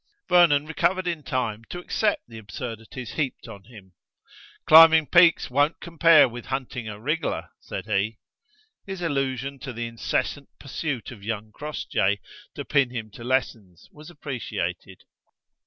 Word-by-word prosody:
Vernon 165 -5 +5
recovered 185 +4 0
in 170 -3 -2
time 115 -5 -3
to 175 - -8
accept 205 +4 -1
the 115 -1 -10
absurdities 115 +3 -7
heaped 140 -4 -3
on 100 -3 -11
him. 100 -5 -15 0.7
"Climbing 160 0 +8
peaks 170 +1 +5
won't 145 +5 +2
compare 165 -3 +5
with 120 0 -9
hunting 130 -3 -4
a 105 -1 -7
wriggler," 150 +7 -2
said 95 - -7
he. 110 +1 -1 0.7
His 190 -2 -5
allusion 135 -3 -2
to 135 - -6
the 120 0 -4
incessant 115 +4 -3
pursuit 140 -3 -4
of 105 -5 -12
young 110 0 -4
Crossjay 105 -8 -1 0.4
to - - -6
pin 140 -3 +2
him 115 -3 -6
to 115 - -11
lessons 115 -8 -2
was 150 +2 -13
appreciated. 145 -6 -5
130 Hz, 140 wpm, -25 LUFS, 115-155 Hz, 0.7 s, Climbing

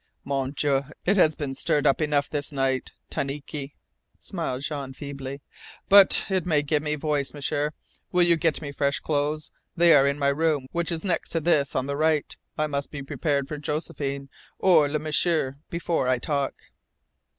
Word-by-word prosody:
"Mon 135 -2 -1
Dieu, 140 -1 +1 0.2
it 195 - +3
has 155 -5 +4
been 140 -3 -4
stirred 145 +2 0
up 140 - +3
enough 145 -2 +1
this 145 -1 -3
night, 135 -2 -1 0.2
tanike," 140 0 -4 0.4
smiled 130 +2 -4
Jean 140 -4 -4
feebly. 140 0 -7 0.5
"But 200 -1 +7
it 190 -3 0
may 155 -4 +2
give 150 0 +1
me 150 0 -1
voice, 150 -1 -2
M'sieur. 145 +1 -1 0.4
Will 180 -1 +4
you 170 -1 +5
get 160 -1 0
me 140 - -5
fresh 140 0 0
clothes? 150 0 -1 0.3
They 170 0 +6
are 140 -1 +6
in 140 +1 0
my 140 -1 +2
room 150 -1 +1
which 170 0 -1
is 165 -1 -3
next 180 -3 -1
to 165 - +2
this 150 -3 +1
on 130 - 0
the 140 0 -3
right. 155 0 +1 0.2
I 155 - +1
must 140 -1 -3
be 140 -2 -7
prepared 140 0 -1
for 150 0 -5
Josephine 145 -2 -4 0.3
or 160 -6 +4
Le 150 - 0
M'sieur 155 -2 +1
before 170 -5 -1
I 130 0 +3
talk." 140 +2 -2
145 Hz, 180 wpm, -25 LUFS, 140-155 Hz, 0.5 s, But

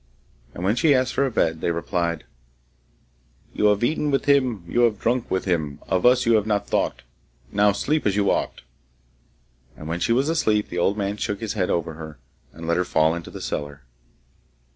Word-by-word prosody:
And 85 - -6
when 100 +4 +2
she 145 +3 +4
asked 130 0 +1
for 140 - +1
a - - -4
bed, 80 -7 0
they - - 0
replied: 85 0 -2 1.3
You - - 0
have 105 +1 +3
eaten 150 +3 0
with 135 -1 0
him 130 -9 +2
You 120 - -1
have 115 -4 +2
drunk 120 0 0
with 95 - -1
him, 80 -6 -1
Of 95 +5 +1
us 125 0 +4
you 115 - +4
have 105 0 -1
not 105 -1 0
thought, - - -1 0.5
Now 105 0 +4
sleep 145 +7 0
as 100 - +1
you 100 -1 +2
ought! - - -2 1.2
And 75 - -9
when 85 +2 -3
she 115 - 0
was 130 +5 +2
asleep, 110 -10 +1
the 90 - -3
old 100 +4 +1
man 100 0 -2
shook 100 -1 -3
his 110 -3 -3
head 95 -5 -1
over 85 -1 -1
her, 80 -1 -9 0.3
and 80 +1 -9
let 85 - +1
her 90 - +2
fall 80 -2 +2
into 85 -1 -6
the - - -9
cellar. 70 -1 -5
100 Hz, 205 wpm, -23 LUFS, 85-120 Hz, 1.3 s, she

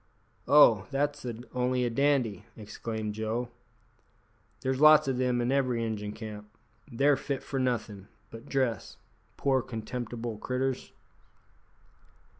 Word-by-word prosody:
"Oh! 115 -9 +6
that's 145 +1 -1 0.3
only 125 0 +1
a 120 - -1
dandy," 130 -6 +1
exclaimed 110 0 -5
Joe. 110 +3 -3 1.1
"There's 130 0 -1
lots 155 -2 +7
o' 135 - +1
them 125 -1 0
in 120 +2 0
every 130 -4 +1
Injun 105 -2 -4
camp. 105 -2 -8 0.4
They're 140 +4 +3
fit 135 0 -4
for 135 - -3
nothin' 110 -6 -2 0.2
but 115 0 -11
dress, 130 -6 -1 0.4
poor 135 -2 +2
contemptible 115 -1 -5
critters." 130 +2 -2
125 Hz, 115 wpm, -29 LUFS, 110-135 Hz, 1.1 s, lots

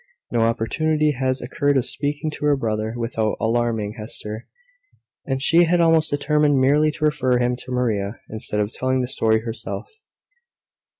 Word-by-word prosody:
No 120 - +1
opportunity 150 +7 +1
had 130 -1 -1
occurred 140 +3 +1
of 125 - +1
speaking 145 +2 -2
to 150 - -5
her 145 -1 +4
brother 110 -3 -2
without 115 -2 -1
alarming 115 -2 -1
Hester; 110 0 -6 0.8
and 135 -1 -1
she 170 +5 +4
had 175 +1 +2
almost 165 -2 +4
determined 145 0 +2
merely 145 +4 +4
to 155 0 -2
refer 130 -4 +2
him 125 0 +1
to 130 - -10
Maria, 110 -4 -1
instead 105 -1 -4
of 105 +1 -2
telling 130 +1 0
the 125 - -2
story 110 -3 +1
herself. 115 - -6
130 Hz, 160 wpm, -22 LUFS, 115-150 Hz, 0.8 s, her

